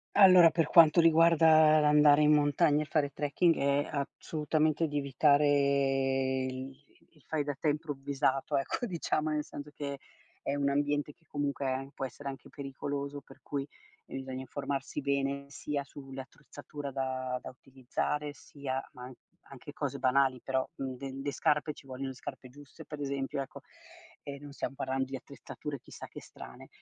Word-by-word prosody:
Allora, 185 Hz, -4 st, +9 dB
per 165 Hz, 0 st, +1 dB
quanto 165 Hz, +1 st, +7 dB
riguarda 160 Hz, -1 st, +6 dB
l'andare 150 Hz, 0 st, +6 dB
in 150 Hz, 0 st, +6 dB
montagna 145 Hz, 0 st, +3 dB
e -, -, -3 dB
fare 145 Hz, -2 st, 0 dB
trekking 150 Hz, +4 st, +2 dB
è 140 Hz, +1 st, +1 dB, 0.3 s
assolutamente 155 Hz, +1 st, 0 dB
di 145 Hz, -1 st, -3 dB
evitare 140 Hz, -2 st, +2 dB
il 130 Hz, +2 st, -8 dB, 0.2 s
il 150 Hz, -4 st, -25 dB
fai 155 Hz, -2 st, -1 dB
da 145 Hz, -1 st, -3 dB
te -, -, -1 dB
improvvisato, 140 Hz, -1 st, -1 dB
ecco. 135 Hz, -, -2 dB
Diciamo, 155 Hz, -5 st, -1 dB
nel 150 Hz, -1 st, 0 dB
senso 145 Hz, 0 st, -9 dB
che 140 Hz, -1 st, -5 dB, 0.4 s
è 140 Hz, -, -2 dB
un 140 Hz, -1 st, +1 dB
ambiente 145 Hz, +1 st, 0 dB
che 165 Hz, -, -34 dB
comunque 140 Hz, -2 st, -2 dB
può 135 Hz, -, -4 dB
essere 140 Hz, +2 st, -7 dB
anche 135 Hz, -, -9 dB
pericoloso, 140 Hz, 0 st, -5 dB
per -, -, -17 dB
cui 140 Hz, -1 st, -4 dB, 0.4 s
bisogna 130 Hz, -1 st, -6 dB
informarsi 140 Hz, +1 st, -4 dB
bene, 140 Hz, 0 st, -1 dB
sia 140 Hz, +1 st, -3 dB, 0.3 s
sull'attrezzatura 145 Hz, +1 st, -8 dB
da 130 Hz, -1 st, -2 dB
da -, -, -7 dB
utilizzare, 135 Hz, +3 st, -3 dB
sia 135 Hz, -2 st, -5 dB
ma 125 Hz, -, -11 dB
an 130 Hz, -, -9 dB, 0.4 s
anche -, -, -10 dB
cose -, -, -3 dB
banali, 130 Hz, 0 st, +2 dB
però, 130 Hz, -1 st, 0 dB
nde 135 Hz, 0 st, -5 dB
le 145 Hz, -, -1 dB
scarpe, 150 Hz, +1 st, +1 dB
ci 140 Hz, -, -16 dB
vogliono 135 Hz, +1 st, -5 dB
le -, -, -6 dB
scarpe 130 Hz, 0 st, -9 dB
giuste 145 Hz, +4 st, -13 dB
per 150 Hz, -, -8 dB
esempio, 140 Hz, -1 st, -2 dB
ecco, 135 Hz, -, -8 dB, 0.6 s
e 140 Hz, -1 st, -7 dB
non 145 Hz, 0 st, -10 dB
stiam 140 Hz, -, -4 dB
parlando 130 Hz, 0 st, -1 dB
di 135 Hz, +1 st, -6 dB
attrezzature 140 Hz, +1 st, -8 dB
chissà -, -, -10 dB
che -, -, -10 dB
strane, -, -, -12 dB
140 Hz, 160 wpm, -31 LUFS, 135-150 Hz, 0.6 s, Allora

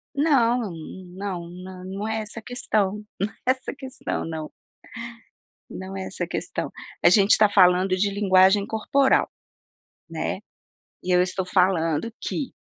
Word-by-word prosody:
Não 250 Hz, -, +2 dB, 0.4 s
não 185 Hz, -3 st, -5 dB, 0.4 s
não 195 Hz, +3 st, -4 dB
é 220 Hz, 0 st, -1 dB
essa 215 Hz, +2 st, -6 dB
a -, -, -12 dB
questão 210 Hz, -4 st, -1 dB, 0.2 s
não 200 Hz, -, +1 dB, 0.2 s
é -, -, +7 dB
essa 260 Hz, +1 st, -4 dB
questão, 265 Hz, -1 st, -4 dB
não, 160 Hz, -1 st, -5 dB, 1.2 s
não 190 Hz, +1 st, -7 dB
é 190 Hz, -, -4 dB
essa -, -, -3 dB
questão. -, -, -3 dB, 0.3 s
A -, -, +8 dB
gente 200 Hz, +2 st, +6 dB
tá 215 Hz, -1 st, +5 dB
falando 185 Hz, -1 st, +5 dB
de 200 Hz, +2 st, +1 dB
linguagem 195 Hz, 0 st, +4 dB
corporal, 265 Hz, +5 st, +2 dB, 0.8 s
né. -, -, -3 dB, 0.6 s
E 185 Hz, -, -4 dB
eu 180 Hz, -, +5 dB
estou 185 Hz, +1 st, -1 dB
falando 180 Hz, +1 st, +1 dB
que, 275 Hz, -, -3 dB
200 Hz, 135 wpm, -24 LUFS, 185-225 Hz, 1.2 s, A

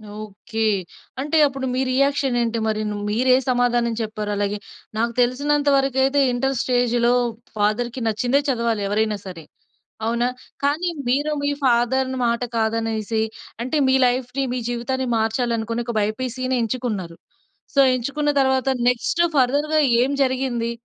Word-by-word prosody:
Okay. 215 Hz, +1 st, -8 dB, 0.6 s
అంటే, 300 Hz, +3 st, 0 dB
అప్పుడు 270 Hz, -1 st, -2 dB
మీ -, -, 0 dB
reaction 275 Hz, -1 st, +1 dB
ఏంటి 230 Hz, -1 st, -1 dB
మరి? 215 Hz, 0 st, 0 dB, 0.3 s
మీరు 240 Hz, +5 st, +1 dB
ఏ -, -, +4 dB
సమాధానం 240 Hz, -1 st, +2 dB
చెప్పారు? 215 Hz, -1 st, -4 dB
అలాగే 205 Hz, 0 st, -1 dB, 0.4 s
నాకు 235 Hz, +1 st, 0 dB
తెలిసినంత 285 Hz, +4 st, +1 dB
వరకు 270 Hz, -1 st, 0 dB
అయితే, 275 Hz, +2 st, +2 dB
ఇంటర్ 270 Hz, +2 st, 0 dB
స్టేజ్‌లో 245 Hz, -1 st, +2 dB, 0.4 s
ఫాదర్‌కి 235 Hz, +4 st, 0 dB
నచ్చిందే 245 Hz, +5 st, +1 dB
చదవాలి. 235 Hz, -4 st, 0 dB
ఎవరైనా 215 Hz, 0 st, 0 dB
సరే, 180 Hz, -4 st, -8 dB, 0.6 s
అవునా? 235 Hz, +2 st, +1 dB, 0.4 s
కానీ 305 Hz, +6 st, +1 dB, 0.2 s
మీరో 290 Hz, +4 st, +1 dB
మీ 285 Hz, -, +1 dB
ఫాదర్‌ని 260 Hz, +2 st, +2 dB
మాట 235 Hz, +1 st, 0 dB, 0.2 s
కాదనేసి, 220 Hz, 0 st, -1 dB, 0.4 s
అంటే 260 Hz, +5 st, -1 dB
మీ 265 Hz, -, +4 dB
లైఫ్‌ని 250 Hz, +2 st, -1 dB
మీ 250 Hz, -, -1 dB
జీవితాన్ని 255 Hz, +2 st, -2 dB
మార్చాలి 225 Hz, +2 st, 0 dB
అనుకొని 230 Hz, +2 st, -3 dB
ఒక 235 Hz, -1 st, -4 dB
బైపీసీని 255 Hz, +4 st, -2 dB
ఎంచుకున్నారు. 215 Hz, -8 st, -3 dB, 0.6 s
సో, 280 Hz, -, +4 dB, 0.2 s
ఎంచుకున్న 285 Hz, +4 st, -1 dB
తర్వాత 265 Hz, 0 st, +1 dB, 0.2 s
నెక్స్ట్ 250 Hz, +8 st, +1 dB
ఫర్దర్‌గా 290 Hz, +4 st, +2 dB, 0.2 s
ఏం 265 Hz, -, +1 dB
జరిగింది? 255 Hz, -3 st, -1 dB
245 Hz, 135 wpm, -22 LUFS, 225-265 Hz, 0.6 s, ఏ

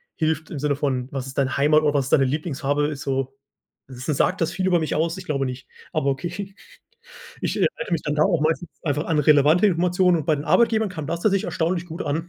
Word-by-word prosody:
hilft 160 Hz, -1 st, -1 dB
im 145 Hz, -, -5 dB
Sinne 145 Hz, -1 st, 0 dB
von: 130 Hz, -3 st, -1 dB
„Was 135 Hz, -2 st, -4 dB
ist 135 Hz, -, -10 dB
deine 135 Hz, -1 st, +1 dB
Heimat 150 Hz, +2 st, +4 dB
oder 150 Hz, -1 st, +2 dB
was 140 Hz, -3 st, +1 dB
ist -, -, -3 dB
deine 135 Hz, -2 st, +5 dB
Lieblingsfarbe?", 145 Hz, 0 st, -1 dB
ist 145 Hz, -2 st, -5 dB
so 135 Hz, 0 st, -2 dB, 0.5 s
s 125 Hz, +1 st, -9 dB
s 145 Hz, -, 0 dB
sagt 185 Hz, -, +1 dB
das 165 Hz, +1 st, +1 dB
viel 190 Hz, +1 st, -2 dB
über 175 Hz, -2 st, +3 dB
mich 155 Hz, -, -2 dB
aus? 165 Hz, +3 st, 0 dB
Ich 185 Hz, -, -9 dB
glaube 140 Hz, -3 st, -1 dB
nicht. 130 Hz, 0 st, -6 dB, 0.3 s
Aber 140 Hz, -, 0 dB
okay. 185 Hz, +7 st, -5 dB, 0.9 s
Ich -, -, -1 dB
erinnere 235 Hz, -, -1 dB
mich 165 Hz, -, 0 dB
dann 150 Hz, -, -1 dB
da 150 Hz, -, +4 dB
auch 170 Hz, -6 st, +2 dB
meistens 165 Hz, +3 st, 0 dB
einfach 150 Hz, 0 st, -1 dB
an 160 Hz, -2 st, +1 dB
relevante 150 Hz, +6 st, +5 dB
Informationen 180 Hz, 0 st, +2 dB
und 150 Hz, -, -5 dB
bei 155 Hz, -, +3 dB
den 145 Hz, -, -5 dB
Arbeitgebern 220 Hz, -1 st, +3 dB
kam 155 Hz, -5 st, -6 dB
das 170 Hz, +2 st, -3 dB
tatsächlich 195 Hz, -3 st, +2 dB
erstaunlich 170 Hz, +1 st, -1 dB
gut 165 Hz, 0 st, -6 dB
an. 160 Hz, +4 st, -3 dB
155 Hz, 240 wpm, -23 LUFS, 140-175 Hz, 0.9 s, deine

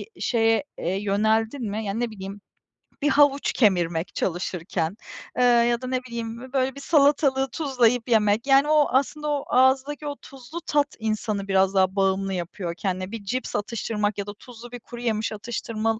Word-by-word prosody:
bir -, -, -14 dB
şeye, 225 Hz, +1 st, +2 dB
eee, 180 Hz, +3 st, -2 dB
yöneldin 220 Hz, +4 st, 0 dB
mi? 215 Hz, +1 st, -3 dB
Yani, 200 Hz, +3 st, -2 dB
ne 240 Hz, -2 st, -1 dB
bileyim 195 Hz, 0 st, -8 dB, 0.6 s
bir 295 Hz, -, +2 dB
havuç 285 Hz, -1 st, +4 dB
kemirmek 175 Hz, -6 st, +1 dB
çalışırken, 175 Hz, 0 st, -2 dB, 0.4 s
eee, 250 Hz, -, +3 dB
ya 240 Hz, 0 st, +4 dB
da 255 Hz, -, -5 dB
ne 255 Hz, 0 st, -1 dB
bileyim 235 Hz, -2 st, -5 dB
bö 260 Hz, +1 st, -11 dB
böyle 265 Hz, -1 st, +1 dB
bir 280 Hz, -, -8 dB
salatalığı 280 Hz, -3 st, +3 dB
tuzlayıp 250 Hz, -5 st, +1 dB
yemek. 215 Hz, +2 st, +2 dB
Yani, 275 Hz, +1 st, +5 dB
o 305 Hz, -1 st, +4 dB
aslında 290 Hz, +4 st, 0 dB
o 290 Hz, -2 st, 0 dB
ağızdaki 270 Hz, +4 st, +2 dB
o 285 Hz, -, -3 dB
tuzlu 275 Hz, +6 st, -9 dB
tat 290 Hz, -2 st, +1 dB
insanı 215 Hz, -2 st, -2 dB
biraz 195 Hz, 0 st, +3 dB
daha 190 Hz, 0 st, +3 dB
bağımlı 195 Hz, 0 st, +1 dB
yapıyor 175 Hz, 0 st, -4 dB
kendine. 185 Hz, 0 st, -3 dB
Bir 225 Hz, -3 st, -6 dB
cips 250 Hz, +5 st, -3 dB
atıştırmak 210 Hz, -1 st, -2 dB
ya 200 Hz, 0 st, -4 dB
da 205 Hz, -, -5 dB
tuzlu 240 Hz, -1 st, -12 dB
bir 245 Hz, -, -7 dB
kuruyemiş 230 Hz, -2 st, -3 dB
atıştırmal 220 Hz, 0 st, -3 dB
230 Hz, 175 wpm, -24 LUFS, 200-260 Hz, 0.6 s, Yani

